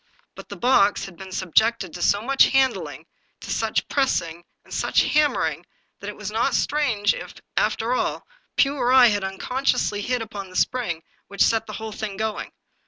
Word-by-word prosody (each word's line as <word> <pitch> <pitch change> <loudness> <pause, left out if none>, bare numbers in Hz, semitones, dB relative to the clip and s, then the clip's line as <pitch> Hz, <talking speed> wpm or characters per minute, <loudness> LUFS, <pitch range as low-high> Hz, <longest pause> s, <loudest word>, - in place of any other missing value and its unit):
But - - -12
the - - -6
box 220 -5 +3
had 195 - -11
been 190 +2 -10
sub 185 -3 -5
jected 220 -6 +2
to 175 - -7
so 205 +4 +2
much 270 +2 +5
handling, 265 -1 0 0.4
to - - -7
such - - -1
pressing 170 - -1 0.2
and - - -12
such - - +2
hammering, 300 -1 +1 0.4
that 200 - -6
it 210 - -7
was 210 -1 -5
not 230 +5 +1
strange 250 -9 +1
if, - - -8 0.2
after - - +1
all, - - -1 0.3
Pugh 280 +1 +3
or 250 -1 +1
I 260 -1 +8
had 205 -2 -1
unconsciously 205 +2 -1
hit 245 +2 -1
upon 205 -3 -8
the 185 - -14
spring 185 -11 -1 0.2
which 200 - +1
set 225 -1 +1
the - - -7
whole 220 0 -6
thing 210 -2 -5
going. 220 0 -3
220 Hz, 185 wpm, -23 LUFS, 195-255 Hz, 0.4 s, I